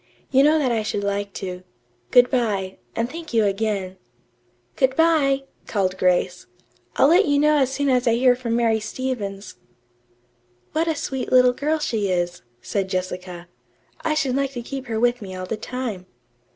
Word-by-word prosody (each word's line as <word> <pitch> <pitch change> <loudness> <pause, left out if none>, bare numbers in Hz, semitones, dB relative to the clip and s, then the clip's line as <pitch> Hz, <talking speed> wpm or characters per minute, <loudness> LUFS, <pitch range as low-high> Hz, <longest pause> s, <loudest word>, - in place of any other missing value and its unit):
"You 270 0 +5
know 300 +3 +5
that 275 -5 +1
I 225 -2 +1
should 210 -1 -3
like 200 0 -2
to. 180 -2 -6 0.5
Good 245 0 +5
bye, 205 -7 -1 0.2
and 230 +1 0
thank 320 -1 -8
you 225 - +4
again." 195 -2 -1 0.8
"Good 265 0 +2
bye," 295 -4 +3 0.2
called 190 -3 0
Grace. 180 -1 +1 0.5
"I'll 275 - +5
let 355 +4 +5
you 285 -1 +3
know 300 +1 +4
as 265 -2 +2
soon 285 +1 -1
as 250 -2 +2
I 230 - +4
hear 250 +1 +4
from 240 -2 -2
Mary 230 -2 +2
Stevens." 215 -4 -5 1.1
"What 320 +2 0
a 325 - +1
sweet 265 -2 -4
little 250 -1 +6
girl 300 +5 0
she 225 -10 -1
is," 175 -1 -1 0.2
said 195 -2 -2
Jessica. 180 -1 -4 0.6
"I 310 -1 0
should 275 -5 0
like 275 0 -1
to 240 -2 -5
keep 270 +1 -6
her 225 -1 -2
with 245 +1 +2
me 190 -2 -7
all 185 0 -5
the 225 - -3
time." 220 -5 -5
240 Hz, 180 wpm, -22 LUFS, 200-270 Hz, 1.1 s, little